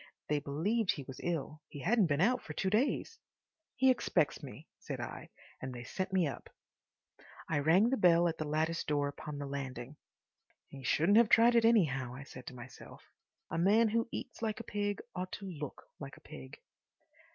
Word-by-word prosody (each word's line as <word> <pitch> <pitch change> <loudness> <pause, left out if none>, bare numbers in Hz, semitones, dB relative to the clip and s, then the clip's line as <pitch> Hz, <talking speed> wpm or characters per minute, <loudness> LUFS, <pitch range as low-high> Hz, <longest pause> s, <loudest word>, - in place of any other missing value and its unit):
They 150 -1 +2
believed 180 +10 0
he 140 - -7
was 135 0 -10
ill; 155 -2 -3
he 145 - -8
hadn't 210 - +3
been 145 0 +1
out 245 +6 +3
for 150 - -8
two 190 +4 -1
days. 270 - 0 0.6
"He 260 +2 +5
expects 185 - +1
me," - - -10
said - - -6
I, - - -7 0.3
and 130 -1 -5
they 120 - -7
sent 185 +9 -4
me 185 -3 +3
up. 140 -5 -6 1.0
I 160 - 0
rang 180 - +4
the 265 - +2
bell 175 -3 +5
at 165 -1 -3
the 155 - -2
lattice 160 +2 0
door 145 -1 0
upon 145 +1 -7
the 145 - -4
landing. 135 -1 -6 0.7
"He 135 - -10
shouldn't 170 - +4
have 235 -2 +4
tried 235 +1 +6
it, 230 -1 +4
anyhow," 135 - +2
I 135 - -8
said 130 -2 -12
to 130 - -7
myself. 125 +1 -12 0.4
"A - - -1
man 215 +6 +4
who 230 +2 0
eats - - -6
like 215 -1 -2
a - - -6
pig 205 -1 -2
ought 185 0 -4
to 200 - -6
look 150 -7 -7 0.2
like - - -8
a - - -18
pig." 65 -1 -11
165 Hz, 195 wpm, -33 LUFS, 140-210 Hz, 1.0 s, tried